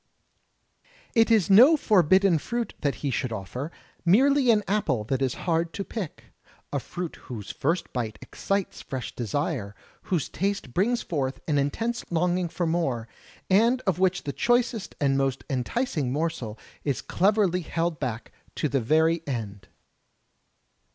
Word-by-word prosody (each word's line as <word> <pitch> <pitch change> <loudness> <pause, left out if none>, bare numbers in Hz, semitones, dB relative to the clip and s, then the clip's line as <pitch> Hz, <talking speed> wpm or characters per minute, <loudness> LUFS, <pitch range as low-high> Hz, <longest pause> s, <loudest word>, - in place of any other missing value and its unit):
It 225 -1 +4
is 220 -5 +4
no 255 +11 +8
forbidden 190 - +4
fruit 235 +7 -3
that 140 -5 0
he 140 - +1
should 130 - -1
ofiFer, 115 - -5 0.3
merely 260 +9 +4
an 215 -2 +4
apple 160 - +1
that 130 +4 -2
is 130 -2 0
hard 165 -1 +1
to 200 - -3
pick^— 195 -6 -6 0.5
a - - +1
fruit 175 -2 -6
whose 110 -5 -6
first 165 +6 -1
bite 115 -4 -3
excites 195 -1 -3
fresh 130 -3 -6
desire, 120 - -2 0.3
whose 175 -7 +1
taste 195 -9 -2
brings 235 +6 +1
forth 135 -5 -2
an 145 -3 +2
intense 225 +13 -1
longing 175 +1 +1
for 175 - -2
more, 140 -9 -1 0.4
and 230 +7 +4
of 190 -6 0
which 190 0 +2
the 140 - -4
choicest 240 - +1
and 135 -1 +2
most 135 -1 0
enticing 140 - -1
morsel 135 -7 -2 0.3
is 140 -4 -1
cleverly 195 -2 +2
held 165 -1 -2
back 120 -4 -4 0.2
to 150 - 0
the 135 -1 0
very 160 +6 +3
end. 110 -7 -5
165 Hz, 145 wpm, -26 LUFS, 135-200 Hz, 0.5 s, no